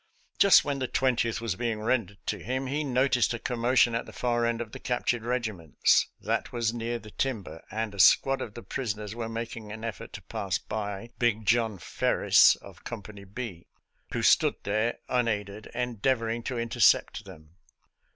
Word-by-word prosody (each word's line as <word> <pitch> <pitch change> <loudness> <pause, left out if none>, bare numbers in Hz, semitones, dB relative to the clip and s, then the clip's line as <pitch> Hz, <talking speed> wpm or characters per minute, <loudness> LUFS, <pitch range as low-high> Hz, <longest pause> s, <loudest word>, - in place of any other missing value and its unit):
Just 200 - +7
when 140 -1 -2
the 130 - -1
Twentieth 120 -4 +1
was 115 -5 -2
being 115 -1 -2
rendered 110 -3 -1
to - - -2
him, 130 +2 -3
he 145 +4 -1
noticed 130 -3 +2
a - - -3
commo 125 +2 -1
tion 120 - +5
at 115 - -2
the - - -9
far 120 -1 0
end 115 -1 -1
of 115 -2 -5
the - - -8
captured 120 -1 -1
regiments. 110 - +1
That - - -2
was 115 -2 0
near 120 0 -3
the 105 -2 -12
timber, 105 -11 -3
and 110 -1 -3
a 100 - -10
squad 135 +7 +5
of 105 - -6
the 120 - -8
prisoners 105 -4 -4
were 115 -1 -4
making 115 -1 -6
an 110 +1 -8
effort 110 -7 -6
to - - -8
pass - - -2
by 105 +1 -5
" - - -36
Big 110 -3 +1
John 115 -1 +2
Ferris," 85 - +4
of - - -15
Company 105 -3 -8
B, 100 -4 -7 0.4
who - - -2
stood - - +4
there 110 +3 0
unaided 105 -4 -1
endeavoring 120 -1 -1
to 130 - -3
intercept 115 -1 +3
them. 85 -3 -14
115 Hz, 180 wpm, -28 LUFS, 105-120 Hz, 0.4 s, Just